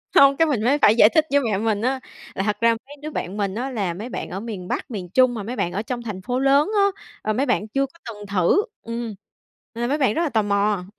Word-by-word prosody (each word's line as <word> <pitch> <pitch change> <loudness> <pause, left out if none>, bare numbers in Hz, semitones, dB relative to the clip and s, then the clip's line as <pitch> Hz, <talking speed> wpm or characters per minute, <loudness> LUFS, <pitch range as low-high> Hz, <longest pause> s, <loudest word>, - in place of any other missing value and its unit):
Không, 275 0 +7
cái 325 - +4
mình 255 -8 0
mới 265 +5 +3
phải 210 - +6
giải 215 -2 +7
thích 315 +5 +3
với 285 - +5
mẹ 220 -6 0
mình 215 0 0
á 260 +3 0 0.4
là 195 - -1
thật 210 0 0
ra 230 - +5 0.2
mấy 290 - -11
đứa 305 - -5
bạn 195 -7 -4
mình 200 -1 -1
á 250 +4 -3
là 200 -8 -2
mấy 210 +8 -7
bạn - - -5
ở 190 - -4
miền 205 -5 -6
Bắc, - - -4
miền 190 -5 -5
Trung 255 +5 +4
mà 220 -3 -5
mấy 235 +5 -5
bạn 175 - -1
ở 200 - -1
trong 240 +2 -4
thành 205 -5 -6
phố 250 +5 -2
lớn 275 +5 +4
á, 400 - +5 0.4
ờ, 215 - -1
mấy 260 +6 +1
bạn 240 -5 0
chưa 275 +5 0
có 305 +5 -17
từng 205 -1 -11
thử 195 - +2 0.2
ừm, 230 -2 -5 0.6
nên 230 - -5
là 240 - +1
mấy 285 - +1
bạn 265 -7 +2
rất 330 - 0
là 325 - 0
tò 225 -4 +2
mò. 200 -1 +1
230 Hz, 285 wpm, -22 LUFS, 205-270 Hz, 0.6 s, Không